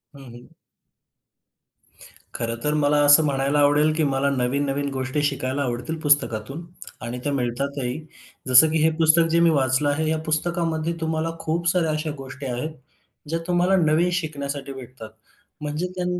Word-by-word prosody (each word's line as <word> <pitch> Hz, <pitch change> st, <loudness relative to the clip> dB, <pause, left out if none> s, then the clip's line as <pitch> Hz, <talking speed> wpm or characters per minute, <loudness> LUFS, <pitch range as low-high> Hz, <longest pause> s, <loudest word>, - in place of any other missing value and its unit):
हं, 135 Hz, -, -12 dB
हं. 120 Hz, -, -14 dB, 1.9 s
खरं 115 Hz, 0 st, -2 dB
तर 150 Hz, 0 st, +1 dB
मला 150 Hz, 0 st, +2 dB
असं 145 Hz, +2 st, +7 dB
म्हणायला 140 Hz, +1 st, +1 dB
आवडेल, 145 Hz, +2 st, +4 dB
की 160 Hz, -, +1 dB
मला 140 Hz, 0 st, +1 dB
नवीन 135 Hz, +2 st, 0 dB
नवीन 140 Hz, +1 st, -2 dB
गोष्टी 130 Hz, +2 st, -2 dB
शिकायला 140 Hz, -1 st, -1 dB
आवडतील 125 Hz, +4 st, -3 dB
पुस्तकातून 145 Hz, +1 st, 0 dB, 0.4 s
आणि 120 Hz, +1 st, -5 dB
त्या 145 Hz, -, -1 dB
मिळतातही, 130 Hz, +1 st, -2 dB, 0.5 s
जसं 130 Hz, +5 st, +7 dB
की 160 Hz, -, +1 dB
हे 160 Hz, -, +5 dB
पुस्तक 165 Hz, +1 st, +4 dB
जे 170 Hz, -, +3 dB
मी 170 Hz, -, +5 dB
वाचलं 135 Hz, -1 st, +2 dB
आहे. 155 Hz, +2 st, 0 dB
या 160 Hz, -, +1 dB
पुस्तकामध्ये 165 Hz, 0 st, -1 dB
तुम्हाला 160 Hz, 0 st, -1 dB
खूप 170 Hz, +2 st, -2 dB
साऱ्या 170 Hz, -3 st, +1 dB
अशा 155 Hz, 0 st, -2 dB
गोष्टी 135 Hz, +1 st, -9 dB
आहेत 125 Hz, +5 st, -3 dB, 0.6 s
ज्या 165 Hz, +1 st, -1 dB
तुम्हाला 180 Hz, +2 st, +2 dB
नवीन 165 Hz, +1 st, +3 dB
शिकण्यासाठी 140 Hz, -5 st, -4 dB
भेटतात. 125 Hz, -3 st, -10 dB, 0.5 s
म्हणजे 150 Hz, +4 st, -3 dB
त्या, 180 Hz, -1 st, -2 dB
145 Hz, 155 wpm, -23 LUFS, 135-160 Hz, 1.9 s, असं